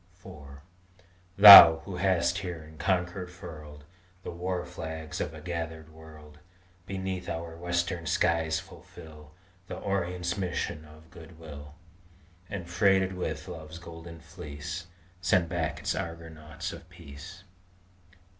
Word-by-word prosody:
IV - - -9 1.1
Thou, 100 -5 +12
who 95 -3 -6
hast 90 -2 +1
here 90 -4 -6
in 80 0 -16
concord 90 -1 -1
furled 75 -4 -11 0.4
The - - -6
war 90 +1 -4
flags 80 -2 -7
of 80 - -4
a 80 - -10
gathered 80 -1 -6
world, 75 -1 -15 0.5
Beneath 95 -1 -5
our 85 0 -5
Western 85 0 -3
skies 80 +1 +1
fulfil 80 -4 -14 0.3
The - - -7
Orient's 90 -1 -3
mission 85 -4 -4
of 80 +1 -17
good 85 -1 -14
will, 75 -2 -11 0.7
And, 90 -4 -6
freighted 95 +1 +2
with 90 -1 -5
love's 80 +1 -9
Golden 85 -1 -11
Fleece, 75 +5 -8 0.3
Send 90 -2 +2
back 80 -3 -3
its - - -1
Argonauts 80 -2 -7
of - - -13
peace. 85 +7 -12
85 Hz, 125 wpm, -28 LUFS, 80-90 Hz, 1.1 s, Thou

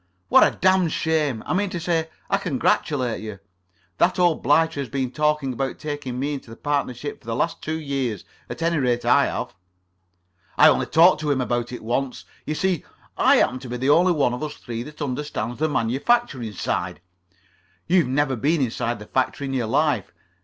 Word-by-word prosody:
"What - - +7
a - - +2
damned 185 -2 +3
shame! 150 -8 0
I - - -2
mean 200 +2 +1
to 180 -2 -4
say, 165 -1 -1 0.2
I - - +2
congratulate 130 -6 0
you. 110 -2 -7 0.6
That 180 - +3
old 175 -3 +2
blighter 150 +3 +2
has 140 - -4
been 135 -3 -2
talking 150 -2 0
about 135 +2 -3
taking 145 -4 -5
me 145 +2 -1
into 120 -5 -8
partnership 145 0 -3
for - - -20
the 115 - -2
last 165 +7 -1
two 160 +1 -3
years. 135 - -3 0.2
At - - -5
any 170 0 +1
rate, 120 -2 0
I - - +4
have." - - -4 1.0
"I - - +8
only - - +1
talked 165 -1 +5
to 150 - -2
him 140 -2 +1
about 120 -1 -1
it 125 - -7
once. 125 +3 -2 0.2
You 155 - -1
see, 185 -2 0 0.3
I - - +5
happen 125 +2 +2
to 130 -1 -9
be 125 - -3
the 130 +3 +2
only 180 +4 +5
one 140 -6 +1
of 125 - -5
us 155 -1 -4
three 115 -1 -6
that 150 +4 -7
understands 125 -4 -4
the 155 0 +1
manufacturing 135 - 0
side. - - -3 0.9
You've 175 -4 +3
never 135 +1 +1
been 150 +8 +1
inside 120 -2 -1
the 105 - -10
factory 130 +4 -1
in 135 - -4
your 125 -4 -1
life. 135 -3 +1
140 Hz, 195 wpm, -23 LUFS, 125-155 Hz, 1.0 s, I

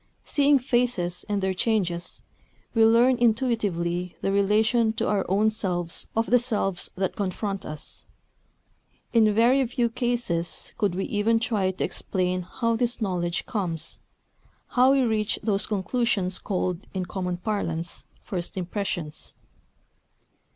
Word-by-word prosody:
Seeing 285 0 +4
faces 240 -9 0
and 200 -2 0
their 190 0 +1
changes, 180 -4 -1 0.5
we 225 - +4
learn 235 +3 +5
intuitively 205 -8 +1
the 195 - 0
relation 220 +3 +3
to - - -1
our 200 -2 +1
own 210 +3 +3
selves 180 -6 -2
of 225 +1 0
the 245 - +7
selves 210 -7 -1
that 190 0 -1
confront 195 0 -3
us. 155 -1 -8 1.1
In 220 -2 +5
very 240 +6 +4
few 240 -1 0
cases 230 -9 -2
could 200 -5 +1
we 195 - -1
even 225 +2 +2
try 215 -5 0
to 185 - -3
explain 185 -1 -1
how 230 +6 -1
this 240 +1 0
knowledge 175 -5 -1
comes, 175 -7 -3 0.7
how 255 +1 +5
we 275 - +4
reach 220 -2 +1
those 205 -3 +1
conclusions 205 -2 0
called, 185 -3 -1 0.2
in 185 -1 -1
common 180 -1 -3
parlance, 175 -4 -3 0.2
"first 180 -1 -4
impressions." 180 -4 -4
205 Hz, 130 wpm, -26 LUFS, 180-230 Hz, 1.1 s, the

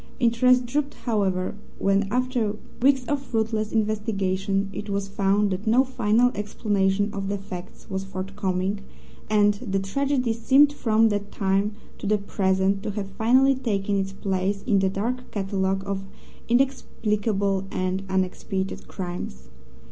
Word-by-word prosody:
Interest 250 +1 +4
drooped, 280 +3 -1
however, 195 -6 0 0.2
when, 195 0 +2
after 245 -3 0 0.3
weeks 265 0 +4
of 285 0 -1
fruitless 220 -4 -1
investigation, 200 -3 0
it 205 +1 -6
was 200 0 -1
found 200 +1 +1
that 190 +4 -3
no 240 +4 +5
final 245 -2 +2
explanation 205 -1 0
of 195 -1 -3
the 200 +1 -1
facts 185 -2 -9
was 190 0 -3
forthcoming, 195 0 -2 0.5
and 205 -1 +4
the 195 -6 -1
tragedy 250 +5 0
seemed 275 +6 +5
from 225 -4 +3
that 205 -1 -2
time 195 +2 +1 0.3
to - - -4
the 210 +1 +3
present 195 -1 +1
to 215 - -3
have 200 -1 -4
finally 255 +6 +4
taken 205 -6 -1
its 195 -1 -1
place 195 0 -1
in 205 -5 +3
the 190 0 +2
dark 240 +6 -3
catalogue 195 -1 -1
of 195 -1 -3 0.5
inexplicable 210 -6 +1
and 185 +1 -1
unexpiated 190 0 -2
crimes. 175 - -6
205 Hz, 140 wpm, -25 LUFS, 195-230 Hz, 0.5 s, no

